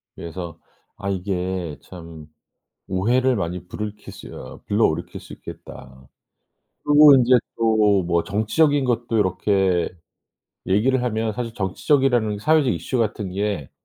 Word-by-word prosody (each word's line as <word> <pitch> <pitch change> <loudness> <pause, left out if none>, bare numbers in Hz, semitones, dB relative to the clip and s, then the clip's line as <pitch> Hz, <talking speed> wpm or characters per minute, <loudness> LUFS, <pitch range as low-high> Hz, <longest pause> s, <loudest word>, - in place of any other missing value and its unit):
그래서 85 0 -7 0.4
'아 100 - -4
이게 90 -4 -3
참 85 -4 -11 0.6
오해를 120 +7 +1
많이 90 -1 -4
부르킬 105 +2 -7
수 - - -11
어 65 - -10
불러일으킬 - - 0
수 - - -13
있겠다.' 65 0 -12 0.8
그리고 145 0 +8
인제 125 0 +3 0.2
또 115 -1 +2 0.3
뭐 85 -1 +1
정치적인 135 +8 +1
것도 120 -2 0
요렇게 95 -2 +1 0.8
얘기를 120 +7 +2
하면 110 -2 -1
사실 120 -1 -4
정치적이라는 115 +2 +1
사회적 155 0 +3
이슈 85 - -3
같은 105 -3 -2
게 100 -7 -3
105 Hz, 275 characters per minute, -22 LUFS, 90-120 Hz, 0.8 s, 그리고